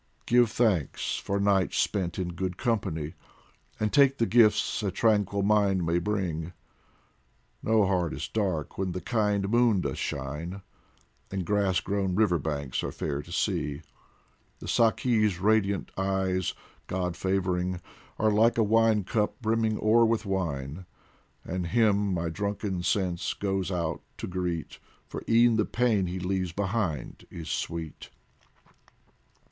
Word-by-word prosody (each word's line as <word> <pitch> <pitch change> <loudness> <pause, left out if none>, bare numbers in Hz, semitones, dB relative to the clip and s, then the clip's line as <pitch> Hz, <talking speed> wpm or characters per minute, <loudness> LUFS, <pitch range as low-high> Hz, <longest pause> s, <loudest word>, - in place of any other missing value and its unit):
Give 120 -1 +4
thanks 105 - 0
for 100 0 -2
nights 100 -2 +2
spent 90 -4 0
in 90 -2 -2
good 90 +1 -3
company, 95 - -1 0.7
And 105 -1 0
take 140 -1 +5
the 115 - +2
gifts 110 +1 +3
a 100 - 0
tranquil 100 0 +1
mind 100 -3 +3
may 85 +1 +2
bring; 90 -4 -2 1.1
No 110 -2 +3
heart 90 -3 +1
is - - -4
dark 95 -9 -2
when 95 -2 -1
the 90 - -3
kind 105 0 0
moon 115 -3 +3
doth - - -3
shine, 75 +8 -4 0.7
And 95 -2 -3
grass 100 -1 +1
grown 95 -2 -1
river 95 -5 +3
banks 70 -3 -3
are - - -3
fair 70 0 -3
to - - -14
see. 75 +2 -1 0.7
The - - -10
Saki's 110 -4 +2
radiant 100 -1 +1
eyes, 95 -1 0 0.3
God 90 -2 -2
favouring, 90 -1 -1 0.4
Are 110 0 +2
like 115 +3 +4
a 115 - +4
wine 110 0 +3
cup 105 +3 -1
brimming 110 -2 +1
o'er 115 +2 +4
with 115 -1 +1
wine, 85 -3 -3 0.6
And 90 0 -3
him 105 -1 +2
my 85 -2 -1
drunken 100 +1 -3
sense 90 -2 0
goes 95 -2 -1
out 85 -4 -2 0.2
to - - -5
greet, 90 -3 -3 0.3
For - - -6
e'en 115 0 +5
the 110 - +2
pain 115 -6 +1
he 90 +1 -4
leaves 90 -1 -2
behind 95 - -2
is 80 -2 -8
sweet. 80 -2 -4
95 Hz, 140 wpm, -28 LUFS, 90-110 Hz, 1.1 s, take